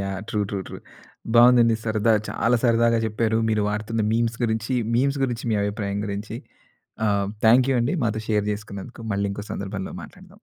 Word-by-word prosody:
Yeah! 95 -1 -3
True, 105 - -1
true, 100 - -2
true. - - -8 0.6
బావుందండి. 120 -1 +6
సరదా 110 0 +2 0.2
చాలా 120 +1 +1
సరదాగా 115 0 +3
చెప్పారు. 110 +1 0
మీరు 105 -1 +1
వాడుతున్న 110 +2 -2
మీమ్స్ 115 0 0
గురించి, 110 +3 -1 0.2
మీమ్స్ 140 +2 +1
గురించి 120 -2 -3
మీ - - +2
అభిప్రాయం 100 -1 -2
గురించి. 105 +2 -5 0.7
ఆహ్, 100 -1 +1 0.2
థాంక్ 125 +3 +5
యూ - - +2
అండి 120 +10 0
మాతో 110 0 -1
షేర్ 105 -1 +1
చేసుకున్నందుకు 105 +3 -9
మళ్ళీ 100 0 0
ఇంకో 105 +1 -7
సందర్భంలో 100 -1 -5
మాట్లాడదాం. 185 0 -14
110 Hz, 165 wpm, -23 LUFS, 105-115 Hz, 0.7 s, బావుందండి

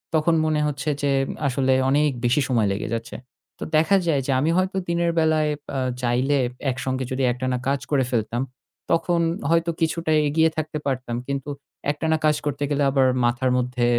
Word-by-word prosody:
তখন 160 +2 +3
মনে 155 -1 +1
হচ্ছে 145 +1 -3
যে 140 -1 +1 0.4
আসলে 130 0 +1 0.2
অনেক 150 +2 +3 0.2
বেশি 130 +5 +3
সময় 115 -5 +2
লেগে 100 - -4
যাচ্ছে। 115 0 -4 0.4
তো - - -4
দেখা 160 +6 +4
যায় 145 -4 +2
যে - - +1
আমি 155 +4 +1
হয়তো 185 +1 0
দিনের 170 0 +1
বেলায় 155 -1 +2 0.3
আ - - 0 0.2
চাইলে 125 +4 +1 0.3
একসঙ্গে 130 +1 -3
যদি 130 +1 -1
একটানা 125 +1 -2
কাজ 140 0 +1
করে 135 -2 +3
ফেলতাম, 120 +1 -1 0.5
তখন 170 +1 +2 0.3
হয়তো 170 0 +2
কিছুটা 165 0 0 0.2
এগিয়ে 160 +2 +3
থাকতে 155 0 -2
পারতাম। 130 -3 -2
কিন্তু 140 +1 -3 0.4
একটানা 160 +2 0
কাজ 150 -1 +4
করতে 145 0 -2
গেলে 145 -1 +1
আবার 135 -1 +3 0.2
মাথার 120 +2 +1
মধ্যে 125 -1 0
140 Hz, 170 wpm, -23 LUFS, 130-155 Hz, 0.5 s, দেখা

